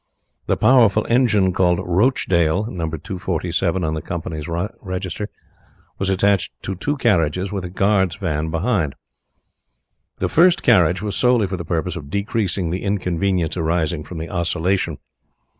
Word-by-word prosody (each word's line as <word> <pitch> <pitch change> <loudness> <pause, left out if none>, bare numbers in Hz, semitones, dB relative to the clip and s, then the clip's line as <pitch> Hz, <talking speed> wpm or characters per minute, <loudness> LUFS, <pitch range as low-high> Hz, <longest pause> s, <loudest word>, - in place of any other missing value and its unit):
The - - +1
powerful 110 -3 +4
engine 110 -6 +3
called 90 -1 +2
Rochdale 90 -2 +1
(No. 85 -3 -3
247 90 +2 -2
on 80 -1 -1
the 80 - -3
company's 80 -2 -5
register) 95 +2 -4 0.7
was 95 - 0
attached 95 0 +2
to 95 - -3
two 145 +11 -2
carriages, 90 - +1
with 100 -2 -3
a - - -5
guard's 95 -1 +1
van 80 -6 -2
behind. 80 - 0 1.2
The - - 0
first 175 +3 +4
carriage 90 -4 +4
was 105 -2 -2
solely 125 -4 +3
for 95 0 -3
the 85 - -5
purpose 85 +3 -2
of 75 -5 -8
decreasing 100 -2 -1
the 90 - -2
inconvenience 90 -4 -1
arising 80 -2 -1
from 80 +3 -9
the 80 +1 -5
oscillation. 90 +2 -1
90 Hz, 140 wpm, -21 LUFS, 85-100 Hz, 1.2 s, powerful